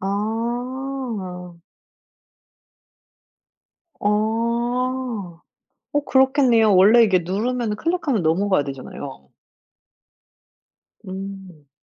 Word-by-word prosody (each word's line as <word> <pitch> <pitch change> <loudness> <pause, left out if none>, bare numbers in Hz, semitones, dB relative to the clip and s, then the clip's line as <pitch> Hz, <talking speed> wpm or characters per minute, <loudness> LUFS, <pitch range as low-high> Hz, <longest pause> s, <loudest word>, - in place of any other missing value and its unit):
아. 225 -3 -4 2.4
어. 230 -2 -1 0.6
어 290 - +2
그렇겠네요. 260 -6 +4
원래 215 +6 +7
이게 190 -4 +3
누르면 215 +5 -2
클릭하면 315 - -1
넘어가야 180 0 +2
되잖아요. 135 - -8 1.8
음. 190 -5 -8
215 Hz, 140 characters per minute, -22 LUFS, 185-250 Hz, 2.4 s, 원래